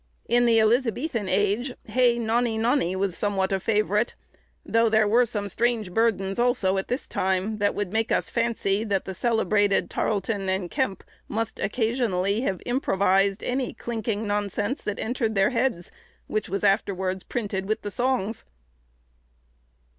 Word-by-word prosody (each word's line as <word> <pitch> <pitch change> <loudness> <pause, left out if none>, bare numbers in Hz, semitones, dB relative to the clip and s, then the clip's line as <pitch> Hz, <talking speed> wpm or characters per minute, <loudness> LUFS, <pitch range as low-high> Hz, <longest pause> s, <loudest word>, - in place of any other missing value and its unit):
In 240 +1 +3
the 230 -1 +5
Elizabethan 230 0 +1
age, 205 +7 +1
"Hey, 245 -2 +3
nonny, 230 0 0
nonny" 225 -5 +1
was 190 -2 -1
somewhat 200 -2 0
a 195 - +1
favourite, 210 +2 +1 0.5
though 230 0 +3
there 220 -1 +3
were 235 +3 +4
some 205 -3 -3
strange 225 -2 -1
burdens 200 -3 +1
also 235 -6 +2
at 190 - -5
this 250 +4 -3
time, 190 +3 -1
that 205 0 +1
would 205 -1 -3
make 225 0 0
us - - +1
fancy 225 -4 0
that 200 -4 -1
the 190 - -5
celebrated 205 -1 +1
Tarleton 200 -1 -1
and 190 -2 -2
Kemp 260 -9 -1 0.2
must 225 +1 -3
occasionally 220 -3 0
have 195 -8 -2
improvised 195 -5 +1
any 255 0 -1
clinking 225 -2 -3
nonsense 205 +4 -1
that 210 - -3
entered 225 -2 -1
their 195 +4 +3
heads, 235 -8 -1 0.3
which 215 -3 -2
was 195 +3 -2
afterwards 190 -2 +1
printed 200 -5 -3
with 215 - -1
the 205 - -4
songs. 240 -3 -1
215 Hz, 150 wpm, -25 LUFS, 195-235 Hz, 0.5 s, the